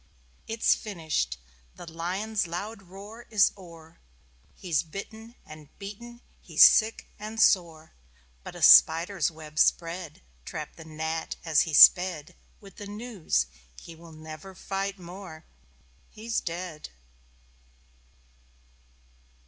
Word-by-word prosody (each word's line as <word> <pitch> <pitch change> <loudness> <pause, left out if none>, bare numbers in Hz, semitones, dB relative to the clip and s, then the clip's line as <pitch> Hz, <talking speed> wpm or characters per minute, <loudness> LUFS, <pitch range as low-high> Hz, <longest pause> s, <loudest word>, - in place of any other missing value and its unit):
It's 225 0 +2
finished. 160 - -3 0.4
The - - -11
Lion's 180 +5 -3
loud 195 +5 -6
roar 200 +5 -13
is 210 -3 +4
o'er. 165 -4 -15 0.6
He's 170 -6 -1
bitten 220 +7 -10
and 155 -1 -13
beaten, 235 +4 -10 0.2
he's - - +4
sick 220 0 +3
and 215 +2 -7
sore. 165 -7 +2 0.5
But - - -10
a - - -6
spider's 170 +1 +6
web 155 -2 -9
spread 170 -2 0 0.2
Trapped - - -8
the 160 - -11
Gnat 160 +1 -4
as 160 -3 +3
he 150 - -1
sped 175 -4 +6 0.2
With 195 -2 -16
the 205 - -8
news...He 155 - -5
will 165 0 -15
never 155 +4 -11
fight 195 +1 -4
more 175 -2 -11 0.6
He's 225 +2 -4
dead! 170 -2 -6
175 Hz, 110 wpm, -27 LUFS, 160-205 Hz, 0.6 s, spider's